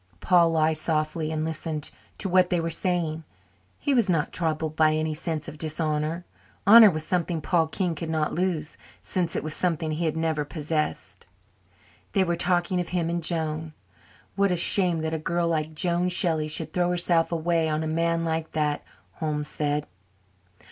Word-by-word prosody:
Paul 170 -2 +4
lay 160 0 +3
softly 155 0 -1
and 155 0 -2
listened 160 -1 -4 0.3
to 200 - -3
what 180 -1 +3
they 175 - +1
were 165 0 -2
saying. 165 -2 -1 0.5
He 285 - 0
was 235 -6 +2
not 165 -4 0
troubled 160 -2 -2
by 155 -1 +3
any 155 0 -1
sense 155 -1 -3
of 150 - -9
dishonour. 155 +1 -2 0.4
Honour 220 +1 +9
was 155 -3 -3
something 175 -1 -1
Paul 165 +1 +1
King 180 +1 -1
could 165 0 -5
not 155 -1 -1
lose 170 -3 -2 0.3
since 175 -3 -1
it - - -2
was 155 0 -1
something 165 -3 -1
he 160 +2 -2
had 160 0 -1
never 160 -2 0
possessed. 150 0 -4 0.9
They 195 - +3
were 170 -2 0
talking 180 +1 +1
of 175 - -3
him 170 -2 -1
and 170 0 -2
Joan. 160 -1 -2 0.6
"What 200 0 +2
a 180 - +1
shame 175 -1 +4
that 160 0 -2
a 160 - -1
girl 170 +2 -1
like 155 -1 -2
Joan 175 +2 +1
Shelley 170 -4 +1
should 155 - -4
throw 175 -1 +1
herself 175 -1 +2
away 165 -1 0
on 155 +1 -1
a - - -2
man 165 +1 0
like 160 0 -3
that," 150 -2 -1 0.3
Holmes 150 -2 -3
said. 150 -1 -1
165 Hz, 180 wpm, -25 LUFS, 155-175 Hz, 0.9 s, Honour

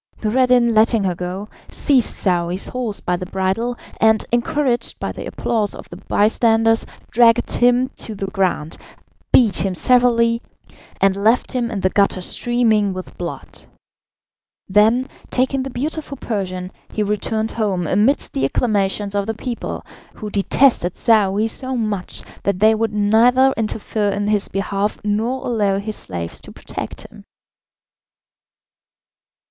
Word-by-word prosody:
Noureddin 245 +1 +3
letting 220 0 +3
her 185 -2 0
go, 180 +3 -5 0.2
seized 265 -5 +2
Saouy's 180 -1 -1
horse 240 -5 -3
by 180 - 0
the 180 0 -6
bridle, 195 +6 -1 0.2
and, 220 -1 +3
encouraged 240 0 0
by - - -3
the - - -7
applause 215 -4 -1
of - - -10
the - - -8
bystanders, 225 +1 +2 0.2
dragged 235 0 +4
him 245 +1 +3
to 220 - -5
the 195 - -4
ground, 190 -5 -1 0.5
beat 225 -7 +4
him 190 -2 -1
severely, 235 +1 +3 0.6
and 195 -1 +3
left 220 +5 +2
him 245 -2 -1
in 210 -4 -4
the 185 - +2
gutter 200 -2 +2
streaming 220 -1 +1
with 185 0 -8
blood. 175 -1 -7 1.0
Then, 220 +6 +3 0.2
taking 260 +1 +1
the 265 - -4
beautiful 285 +3 -4
Persian, 185 -6 -4 0.2
he 215 - -1
returned 215 +2 -1
home 200 -6 -1
amidst 210 - +1
the 135 - -1
acclamations 200 - 0
of 200 0 -1
the 225 - -2
people, 240 +1 -5 0.3
who 210 -2 -7
detested 200 -2 +2
Saouy 210 -3 +3
so 260 +3 -3
much 215 -5 -3 0.2
that 200 -2 0
they 215 +3 +5
would 220 0 -1
neither 235 +6 +4
interfere 215 -1 -2
in 200 +1 -1
his 210 -2 +1
behalf 200 +1 -2
nor 225 +5 -1
allow 205 -5 +1
his 210 +2 -4
slaves 85 -3 -5
to - - -12
protect - - -7
him. - - -14
215 Hz, 140 wpm, -19 LUFS, 195-240 Hz, 1.0 s, they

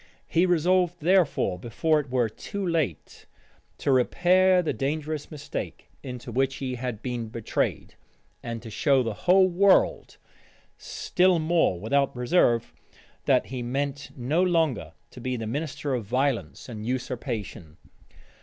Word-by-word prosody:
He 175 +3 +2
resolved, 180 +1 +2
therefore, 165 - +2
before 155 - +1
it 145 -3 -6
were 125 -2 +1
too 195 - -6
late, 155 - -2 0.5
to 140 - 0
repair 180 +8 +4
the 160 - -1
dangerous 150 +2 -3
mistake 150 -2 -7
into 125 -2 -7
which 135 +3 0
he 130 -2 -4
had 125 -3 -5
been 120 -3 -3
betrayed, 115 -1 -2 0.5
and 115 -1 -6
to 115 - -8
show 135 +2 +2
the 115 -2 -2
whole 185 - +4
world, 190 +2 +2 0.6
still 180 0 +1
more 160 - +1
without 140 +8 +1
reserve, 125 -2 +2 0.5
that - - +3
he 130 -1 -5
meant 140 +3 -3
no 140 +8 +1
longer 165 - +1 0.2
to 125 - -11
be 130 +1 -2
the 115 - -4
minister 145 +3 -3
of 120 -3 -1
violence 115 - -1
and 110 -3 -7
usurpation. 120 - -4
135 Hz, 135 wpm, -26 LUFS, 120-165 Hz, 0.6 s, repair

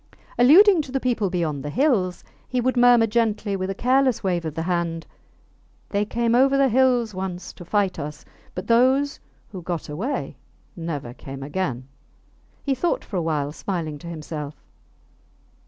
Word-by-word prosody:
Alluding 345 - +7
to 280 - -9
the 270 - 0
people 235 -6 0
beyond 165 -6 -2
the 145 - -5
hills, 210 - +1 0.2
he 255 - -1
would 255 +2 +1
murmur 245 -1 +6
gently, 215 -2 0
with 185 0 -3
a 195 - -3
careless 255 +1 +2
wave 175 -3 0
of 155 -1 -4
the 165 - -2
hand, 170 -2 -1 0.8
They 205 0 0
came 235 +2 0
over 270 +3 +4
the 275 -1 +4
hills 245 -2 +3
once 185 -1 -5
to - - -11
fight 195 +1 0
us, 150 +1 -7 0.3
but 185 - -5
those 260 +5 +3 0.3
who 190 -3 -7
got 170 -3 -4
away 210 - -3 0.4
never 150 -8 -5
came 135 +1 -9
again. 140 -5 -3 0.8
He 275 - +1
thought 335 +7 -1
for 195 - -4
a - - +1
while, 150 -3 -1
smiling 160 -3 -4
to 170 - -10
himself. 155 -3 -6
195 Hz, 165 wpm, -23 LUFS, 165-245 Hz, 0.8 s, Alluding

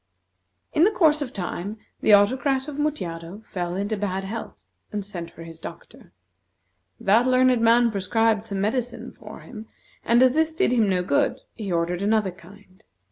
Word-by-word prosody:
In 310 - +4
the 390 - +6
course 315 -7 +3
of 265 -4 -3
time, 195 0 -5 0.2
the - - +2
Autocrat 260 +7 +3
of 295 -2 -6
Mutjado 185 - -3
fell 175 -1 -4
into 205 +3 -1
bad 195 -2 -2
health 220 +4 -6 0.3
and 205 -2 -4
sent 175 -4 -7
for 165 - -12
his 165 -1 -11
doctor. - - -11 0.9
That 225 +6 +3
learned 255 -1 +4
man 230 +1 +4
prescribed 220 +2 +1
some 195 -2 -3
medicine 235 +3 -2
for - - -12
him; 220 -2 -10 0.4
and 235 +2 +4
as 255 -1 +5
this 320 +1 +1
did 385 -3 +2
him 225 -5 +3
no 180 -1 +1
good, 140 -6 +1
he 205 -4 -5
ordered 175 +1 0
another 210 -1 +1
kind. 185 +3 -18
215 Hz, 170 wpm, -24 LUFS, 190-250 Hz, 0.9 s, the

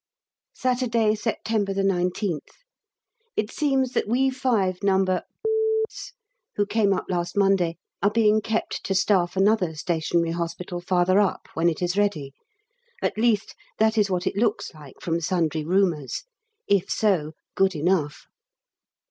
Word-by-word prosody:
Saturday, 240 -4 +1
September 215 -2 -1
19th. 180 -2 0 1.0
It 215 0 -1
seems 270 -4 +1
that - - -1
we 260 +4 +2
five 225 -9 0
No. 195 -1 +3 0.9
s - - -9 0.4
who 205 - +1
came 205 -1 +1
up 190 - 0
last 175 0 -2
Monday 195 -4 +2 0.2
are 200 - +4
being 215 0 +3
kept 225 +1 -2
to 195 - -1
staff 185 -1 +2
another 195 -4 +2
Stationary 165 +1 0
Hospital 170 +1 -4
farther 180 +2 +2
up, 205 -2 0
when 165 +1 +2
it 170 +2 -3
is 180 +3 0
ready; 155 -10 -1 0.7
at - - 0
least 220 -2 +1 0.2
that 220 +1 +3
is 210 -2 +2
what 180 -1 -1
it - - -1
looks 215 +1 0
like 150 -4 -13
from 170 0 -2
sundry 160 -3 0
rumours 170 -5 0 0.4
if 200 -3 +2
so 175 -8 +1 0.2
good 195 -1 +2
enough. 155 -1 0
195 Hz, 140 wpm, -24 LUFS, 175-215 Hz, 1.0 s, are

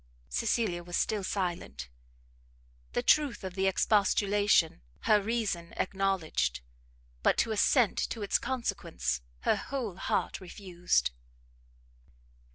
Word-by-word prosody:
Cecilia 215 -6 0
was 175 0 -3
still 210 -2 0
silent; 175 - -3 1.1
the - - 0
truth 290 -8 +3
of 190 -1 -5
the 190 +1 +1
expostulation 200 - +3 0.2
her 210 -1 +4
reason 200 -6 -2
acknowledged, 190 - 0 0.6
but - - +3
to 230 - +2
assent 220 +2 +3
to 225 - -4
its 200 - +2
consequence 70 - -2 0.2
her - - +3
whole 240 -10 -4
heart - - -1
refused. 175 - -1
195 Hz, 105 wpm, -30 LUFS, 175-220 Hz, 1.1 s, her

